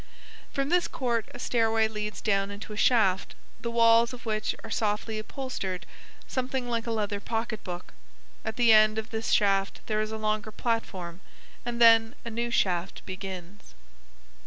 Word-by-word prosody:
From 275 0 -1
this 350 0 +3
court 235 -6 -1
a - - -9
stairway 225 -2 +2
leads 210 -2 -5
down 195 -2 +1
into 205 +1 -7
a - - -6
shaft, 205 -5 +3 0.2
the 235 - -3
walls 230 +1 +5
of 250 0 -10
which 215 -1 -1
are 225 - -8
softly 215 0 -1
upholstered 215 -7 -4 0.4
something 255 -1 -2
like 235 -1 -2
a - - -1
leather 210 -2 -1
pocketbook. 215 -5 -4 0.5
At 220 - -3
the 235 -2 +6
end 215 0 +6
of 220 0 -4
this 225 0 -2
shaft 195 -1 +2
there 215 -1 0
is 215 0 -3
a 220 - -3
longer 215 0 -1
platform, 190 -7 -3 0.4
and 240 0 -4
then 225 0 +6
a 230 - -4
new 235 +1 -1
shaft 185 -5 0
begins...." 190 0 -8
220 Hz, 160 wpm, -28 LUFS, 205-235 Hz, 0.5 s, the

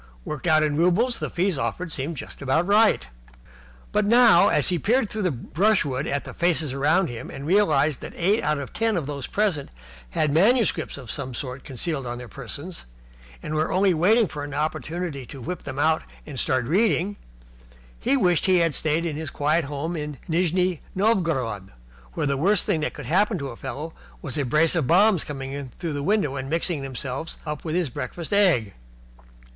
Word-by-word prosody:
Worked 150 +2 -5
out 155 -1 +5
in 150 -1 0
roubles, 190 +9 +2
the - - -3
fees 180 -4 0
offered 130 +10 -2
had - - -9
seemed 150 +2 -3
just - - -8
about 140 +5 +1
right. 205 - +4 0.8
But 210 - +2
now, 230 -3 +6
as 150 - +3
he 175 -2 +1
peered 230 +3 +1
through 215 - -3
the 185 - +2
brushwood 150 - 0
at 140 - -1
the - - -9
faces 165 -5 0
round 150 +7 +2
him, 120 -1 -7
and 140 - -7
realized 155 -6 +2
that - - -7
eight 200 +6 +2
out 150 0 0
of 140 -2 -6
ten 225 -3 +1
of 160 - -2
those 140 -2 -5
present 195 -9 0 0.5
had 150 - +2
manuscripts 195 - +2
of 125 -5 -7
some 125 -1 -4
sort 130 0 -5
concealed 135 +1 -3
on 120 0 -4
their 125 0 -8
persons, 140 +8 -7 0.6
and 150 - -4
were 155 +1 0
only 190 0 +3
waiting 205 +7 +4
for 150 -3 -6
an 145 -1 -6
opportunity 155 0 -3
to 140 - -9
whip 170 +7 -5
them 140 -1 -7
out 160 +2 +2 0.2
and 140 -4 -6
start 130 -1 +1
reading, 195 - +2 0.8
he 140 - +2
wished 175 +3 +2
that - - +4
he - - +5
had 165 -3 +2
stayed 155 +3 +1
at 165 - -2
his 155 0 -4
quiet 155 +4 +1
home 145 +4 -4
in 150 -2 -5
Nijni 180 +1 +1 0.2
Novgorod, 165 - 0 0.4
where - - -1
the 140 -1 0
worst 195 +7 +2
thing 190 -7 +1
that 155 - -2
could - - -8
happen 205 +4 +2
to 140 -4 -4
a 120 - -8
fellow 140 +6 -6 0.3
was 135 -5 -4
a 145 - 0
brace 155 +6 +3
of 160 -7 0
bombs 190 +1 +4
coming 135 -2 -6
in 140 -1 -5
through 165 -3 -3
the 145 - -3
window 150 -5 +1
and 135 0 -5
mixing 165 -1 -1
themselves 135 +3 -5
up 150 -1 -5
with 160 -1 -3
his 175 -7 0
breakfast 155 +10 -5
egg. 165 - +3
155 Hz, 200 wpm, -24 LUFS, 140-180 Hz, 0.8 s, now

